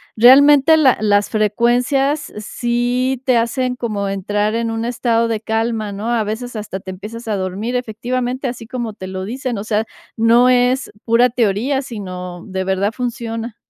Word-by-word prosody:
realmente 285 Hz, +6 st, +7 dB
la 275 Hz, -5 st, +4 dB
las 205 Hz, -1 st, +2 dB
frecuencias 245 Hz, +7 st, +1 dB
sí 245 Hz, +4 st, -1 dB
te 255 Hz, -3 st, +3 dB
hacen 250 Hz, +2 st, 0 dB
como 215 Hz, -5 st, -3 dB
entrar 205 Hz, +2 st, -1 dB
en 230 Hz, 0 st, -1 dB
un 225 Hz, 0 st, -3 dB
estado 235 Hz, -1 st, +1 dB
de 225 Hz, -2 st, -2 dB
calma, 220 Hz, -1 st, -1 dB
¿no? 210 Hz, +4 st, -4 dB
A 235 Hz, -2 st, +1 dB
veces 230 Hz, +4 st, -5 dB
hasta 210 Hz, -3 st, -5 dB
te 190 Hz, -1 st, -8 dB
empiezas 215 Hz, +5 st, -9 dB
a 215 Hz, -, 0 dB
dormir, 195 Hz, +6 st, -3 dB
efectivamente, 250 Hz, +2 st, -2 dB
así 240 Hz, -2 st, -6 dB
como 240 Hz, -3 st, -4 dB
te 190 Hz, -2 st, -8 dB
lo 185 Hz, 0 st, -5 dB
dicen, 250 Hz, +2 st, -4 dB
o 200 Hz, -, -4 dB
sea, 215 Hz, 0 st, 0 dB, 0.3 s
no 230 Hz, +2 st, +4 dB
es 250 Hz, +1 st, +2 dB
pura 235 Hz, +1 st, +4 dB
teoría, 240 Hz, +4 st, 0 dB
sino, 185 Hz, -7 st, -7 dB
de 190 Hz, -1 st, -3 dB
verdad, 190 Hz, +2 st, 0 dB
funciona. 230 Hz, -2 st, -4 dB
230 Hz, 165 wpm, -18 LUFS, 210-250 Hz, 0.3 s, realmente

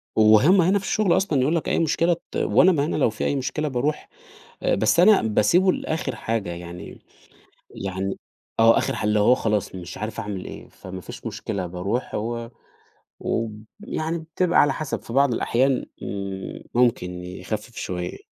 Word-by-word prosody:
وهم 110 Hz, -, +6 dB
هنا 190 Hz, +4 st, +3 dB
في 195 Hz, -, -9 dB
الشغل 210 Hz, -5 st, +2 dB
أصلًا 155 Hz, -9 st, +1 dB
يقول 145 Hz, +6 st, +2 dB
لك 165 Hz, -, -1 dB
أي -, -, +1 dB
مشكلة 170 Hz, +2 st, +2 dB, 0.2 s
ت -, -, -9 dB
وأنا 185 Hz, -, +4 dB
ما 145 Hz, -5 st, +1 dB
أنا 155 Hz, -, -2 dB
لو 135 Hz, -, +3 dB
في 110 Hz, -, -4 dB
أي -, -, +1 dB
مشكلة 135 Hz, +3 st, -2 dB
باروح، 145 Hz, +3 st, -2 dB, 0.7 s
بس -, -, +3 dB
أنا 200 Hz, +3 st, +7 dB
باسيبه 110 Hz, -, +3 dB
لآخر 160 Hz, -2 st, -3 dB
حاجة 110 Hz, -5 st, -2 dB
يعني 85 Hz, 0 st, -8 dB, 0.7 s
يعني 95 Hz, 0 st, -4 dB, 0.4 s
آه 115 Hz, 0 st, +6 dB
آخر -, -, 0 dB
حل 105 Hz, -, -2 dB
اللي 105 Hz, 0 st, +2 dB
هو 105 Hz, +5 st, +5 dB
خلاص 105 Hz, -5 st, -1 dB
مش 90 Hz, -2 st, -8 dB
عارف 110 Hz, +1 st, -5 dB
أعمل 100 Hz, -3 st, -5 dB
إيه، -, -, -9 dB
فما 95 Hz, 0 st, -9 dB
فيش -, -, -10 dB
مشكلة 95 Hz, -4 st, -4 dB
باروح 100 Hz, +8 st, -3 dB
هو 115 Hz, +2 st, -3 dB, 0.7 s
و 115 Hz, 0 st, -1 dB, 0.3 s
يعني 165 Hz, -5 st, -3 dB
بتبقى 170 Hz, +2 st, +1 dB
على 145 Hz, -, +3 dB
حسب 155 Hz, -3 st, -4 dB
في 115 Hz, -, -9 dB
بعض 135 Hz, -1 st, +4 dB
الأحيان 130 Hz, +3 st, +1 dB, 0.2 s
إمم، 100 Hz, -1 st, -5 dB
ممكن 120 Hz, -7 st, +2 dB
يخفف 100 Hz, +6 st, -6 dB
شويّة. 90 Hz, -1 st, -5 dB
115 Hz, 170 wpm, -23 LUFS, 100-155 Hz, 0.7 s, أنا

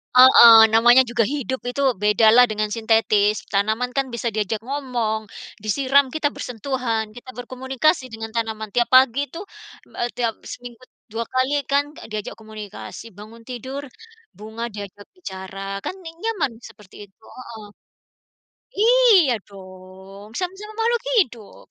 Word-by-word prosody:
heeh, 250 Hz, -2 st, +9 dB, 0.2 s
namanya 240 Hz, +3 st, +6 dB
juga 240 Hz, -1 st, +1 dB
hidup, 265 Hz, -2 st, -3 dB
itu 250 Hz, +3 st, -3 dB, 0.2 s
beda 210 Hz, +2 st, +3 dB
lah 250 Hz, 0 st, +8 dB
dengan 215 Hz, -1 st, -2 dB
sintetis. 215 Hz, -2 st, +1 dB
Tanaman 220 Hz, +5 st, 0 dB
kan 275 Hz, -, +2 dB
bisa 235 Hz, 0 st, -3 dB
diajak 215 Hz, 0 st, -2 dB
ngomong. 245 Hz, -5 st, -2 dB, 0.4 s
Disiram, 275 Hz, +5 st, +2 dB
kita 315 Hz, -2 st, +1 dB
bersentuhan, 230 Hz, -3 st, -3 dB
kita 245 Hz, +4 st, -13 dB
berkomunikasi 260 Hz, +4 st, -1 dB
dengan 225 Hz, 0 st, -6 dB
tanaman 220 Hz, -1 st, -3 dB
tiap 240 Hz, +2 st, +1 dB
pagi 265 Hz, +2 st, +4 dB
itu, 330 Hz, -, -10 dB
eee, 405 Hz, -, -18 dB
me 240 Hz, -, -2 dB
tiap 235 Hz, -2 st, -1 dB, 0.2 s
seminggu 245 Hz, -1 st, -11 dB, 0.3 s
2 230 Hz, +1 st, -3 dB
kali 255 Hz, +2 st, +1 dB, 0.2 s
kan, 280 Hz, +1 st, +3 dB
enggak -, -, -13 dB
diajak 215 Hz, -1 st, -5 dB
komunikasi 215 Hz, 0 st, -10 dB
bangun 225 Hz, +2 st, -13 dB
tidur, 260 Hz, +3 st, -6 dB, 0.5 s
bunga 220 Hz, +2 st, -8 dB
diajak 205 Hz, 0 st, -9 dB
bicara, 190 Hz, -, -9 dB, 0.3 s
kan -, -, -3 dB
ne 330 Hz, -, -7 dB
nyaman 430 Hz, -, -1 dB, 0.2 s
seperti 210 Hz, -4 st, -18 dB
itu 200 Hz, +3 st, -36 dB
heeh. 230 Hz, -4 st, -10 dB, 1.1 s
Iya 440 Hz, -, +5 dB
dong, 190 Hz, +1 st, -13 dB
sama-sama 385 Hz, +4 st, -5 dB
makhluk 465 Hz, +1 st, +1 dB, 0.2 s
hidup. 235 Hz, -, -2 dB
235 Hz, 140 wpm, -21 LUFS, 215-265 Hz, 1.1 s, heeh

